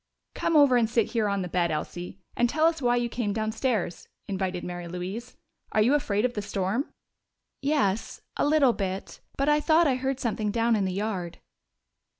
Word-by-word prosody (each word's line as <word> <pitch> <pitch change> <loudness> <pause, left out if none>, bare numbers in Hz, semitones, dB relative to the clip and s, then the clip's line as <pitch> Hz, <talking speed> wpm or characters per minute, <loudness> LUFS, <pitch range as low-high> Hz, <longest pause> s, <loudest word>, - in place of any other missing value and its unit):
"Come 330 - 0
over 280 -4 +6
and 225 -2 +2
sit 230 -2 +1
here 225 -4 +1
on 200 -1 0
the - - -4
bed, 175 0 +1
Elsie, 175 +4 -4 0.2
and 240 0 +2
tell 310 +5 +2
us 325 -2 +2
why 245 -1 +3
you 240 0 +1
came 230 -3 -2
downstairs," 220 -3 -1 0.2
invited 185 -2 -2
Mary 175 -1 -5
Louise. 185 +8 -6 0.4
"Are 215 - +4
you 250 +6 +3
afraid 220 -7 +1
of 250 - 0
the 210 - -3
storm?" 205 +5 -2 0.7
"Yes, 270 -8 0
a - - 0
little 290 -5 +4
bit. 190 -2 -4 0.2
But 275 - +1
I 295 0 +4
thought 320 +2 +4
I 265 -4 +2
heard 265 0 -2
something 220 -3 -1
down 230 +2 +2
in 200 -2 +1
the 185 - -1
yard." 190 -4 -3
220 Hz, 190 wpm, -27 LUFS, 190-260 Hz, 0.7 s, over